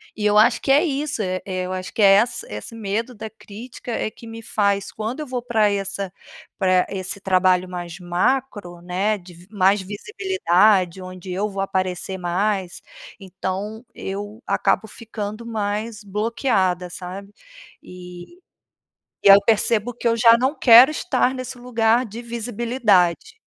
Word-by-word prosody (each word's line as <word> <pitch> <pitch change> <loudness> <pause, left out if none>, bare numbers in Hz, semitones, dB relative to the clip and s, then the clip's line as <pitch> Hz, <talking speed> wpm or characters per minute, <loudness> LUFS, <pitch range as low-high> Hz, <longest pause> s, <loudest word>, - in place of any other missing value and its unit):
E 210 - -3
eu 210 0 +3
acho 230 +3 +4
que 270 - 0
é 290 +4 +5
isso,e 270 - -2
eu 185 -1 -3
acho 185 0 -5
que - - -2
é 195 -1 +8
essa 235 +4 +1
esse 105 - -8
medo 225 +3 -3
da 220 +1 -7
crítica 220 +3 -10
é 220 -1 -2
que 230 - -14
me 225 0 -9
faz, 200 -2 0
quando 225 +7 -5
eu 300 - -6
vou 250 -1 -3
pra 220 -4 +2
essa 195 -1 -3 0.5
pra 185 -2 +3
esse 190 0 -5
trabalho 185 -1 +2
mais 175 -2 -6
macro, 180 +1 -1
né, 190 +5 -1
de 180 -2 -14
vis 175 +2 -17
mais 195 -1 +2
visibilidade, 205 - +1
onde 185 0 -9
eu 200 +4 -1
vou 195 -1 -4
aparecer 190 -1 -3
mais, 185 +1 -1 0.4
então 195 +3 -5
eu 205 +3 -6
acabo 220 - +1
ficando 215 0 -7
mais 215 0 -3
bloqueada, 200 -3 -1
sabe? 195 +2 -8 0.5
E 180 - -12 0.8
e - - +5
aí 195 - +11
eu - - +3
percebo 225 +1 +1
que 240 - -7
eu 230 0 +3
já 230 0 +6
não 265 +5 0
quero 245 +4 +8
estar 280 -5 0
nesse 255 0 -7
lugar 240 0 +1
de 225 +3 -8
visibilidade. 235 - 0
205 Hz, 155 wpm, -22 LUFS, 185-230 Hz, 0.8 s, aí